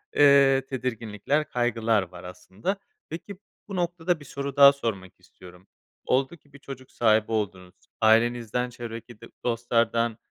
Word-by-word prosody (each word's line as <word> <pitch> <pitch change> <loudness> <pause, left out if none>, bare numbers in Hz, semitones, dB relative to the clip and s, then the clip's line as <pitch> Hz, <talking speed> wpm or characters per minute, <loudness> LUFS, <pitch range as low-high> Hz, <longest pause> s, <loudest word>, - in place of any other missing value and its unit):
eee, 140 -2 +5
tedirginlikler, 125 +2 -2
kaygılar 115 -3 +1
var 90 -1 -12
aslında. 95 - -5 0.3
Peki, 175 +5 -7 0.3
bu 200 - -6
noktada 175 -1 -1
bir 145 - -13
soru 140 -1 -5
daha 140 -1 +9
sormak 100 -9 -5
istiyorum. 90 +1 -17 0.4
Oldu 135 +6 0
ki 145 -2 -30
bir 145 - -13
çocuk 130 -2 -10
sahibi 110 -1 +2
oldunuz 95 -4 -3 0.3
ailenizden, 120 +2 +2
çevredeki 115 -1 -9
d - - -10 0.2
dostlardan, 115 -1 0
120 Hz, 135 wpm, -26 LUFS, 110-140 Hz, 0.4 s, daha